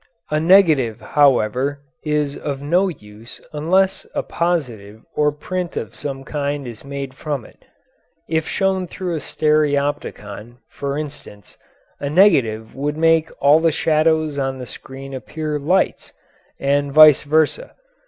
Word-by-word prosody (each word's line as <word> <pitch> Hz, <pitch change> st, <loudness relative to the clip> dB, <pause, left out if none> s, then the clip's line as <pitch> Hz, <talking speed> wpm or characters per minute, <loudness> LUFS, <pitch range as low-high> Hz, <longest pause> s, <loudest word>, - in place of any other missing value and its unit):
A 150 Hz, -, +2 dB
negative, 155 Hz, -, +4 dB
however, 140 Hz, 0 st, +1 dB, 0.2 s
is 150 Hz, -2 st, -1 dB
of 140 Hz, -2 st, -4 dB
no 175 Hz, +7 st, +2 dB
use 110 Hz, -, -10 dB
unless 185 Hz, +6 st, +1 dB
a -, -, -1 dB
positive 120 Hz, -12 st, -3 dB
or 150 Hz, 0 st, +2 dB
print 180 Hz, +4 st, -5 dB
of 110 Hz, -, -5 dB
some 135 Hz, -2 st, -6 dB
kind 145 Hz, 0 st, -3 dB
is 115 Hz, -3 st, -9 dB
made 140 Hz, -1 st, -6 dB
from 140 Hz, -4 st, -4 dB
it. -, -, -19 dB, 0.6 s
If 160 Hz, -1 st, -1 dB
shown 190 Hz, -1 st, 0 dB
through 180 Hz, 0 st, -4 dB
a 160 Hz, -, -2 dB
stereopticon, 140 Hz, -8 st, -1 dB
for 140 Hz, 0 st, -4 dB
instance, 140 Hz, -9 st, -9 dB, 0.4 s
a 140 Hz, -, -3 dB
negative 135 Hz, -, +3 dB
would 145 Hz, +2 st, -3 dB
make 165 Hz, 0 st, +3 dB
all 145 Hz, +3 st, +5 dB
the 165 Hz, 0 st, +2 dB
shadows 155 Hz, -1 st, +1 dB
on 135 Hz, -1 st, -2 dB
the 125 Hz, -, -7 dB
screen 135 Hz, +4 st, -10 dB
appear 150 Hz, +3 st, -4 dB
lights, 170 Hz, +7 st, 0 dB, 0.5 s
and 140 Hz, 0 st, +1 dB
vice 155 Hz, -1 st, +8 dB
versa. 155 Hz, -, 0 dB
145 Hz, 135 wpm, -20 LUFS, 135-160 Hz, 0.6 s, vice